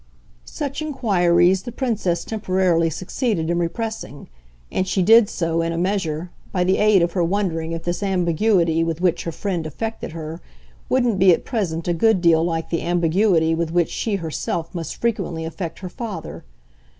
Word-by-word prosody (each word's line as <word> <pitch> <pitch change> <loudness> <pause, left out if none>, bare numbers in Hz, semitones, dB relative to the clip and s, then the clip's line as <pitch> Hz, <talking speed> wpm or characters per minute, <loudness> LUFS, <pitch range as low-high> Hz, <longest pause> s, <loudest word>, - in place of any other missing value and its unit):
Such 285 0 -4
inquiries 190 - +2
the 240 - -7
Princess 215 -9 -1
temporarily 185 -6 +1
succeeded 180 - -2
in 175 - +1
repressing, 175 - -4 0.4
and 185 - -1
she 190 0 +1
did 225 +2 +6
so, 165 -1 -1
in 165 0 -1
a 165 - -3
measure, 175 -3 -1 0.2
by 180 -2 +1
the 185 +1 +2
aid 210 -4 +5
of 170 - 0
her 180 -1 0
wondering 165 -3 -1
if 165 - -5
this 175 +2 -2
ambiguity 175 -2 +2
with 165 -1 -2
which 180 -2 +1
her 165 - -2
friend 165 -1 -3
affected 220 +3 -5
her 160 +1 -7 0.5
wouldn't 245 -6 +2
be 190 0 +7
at 170 - +1
present 180 -9 -2
a 175 - +2
good 220 +3 +3
deal 165 -2 +4
like 165 -1 -2
the 165 - 0
ambiguity 170 -1 +2
with 165 0 -1
which 170 0 +1
she 220 -3 -1
herself 165 -1 -3
must 165 -4 -5
frequently 175 -8 -1
affect 165 0 -5
her 185 - -5
father. 200 -4 -7
175 Hz, 175 wpm, -22 LUFS, 165-205 Hz, 0.5 s, be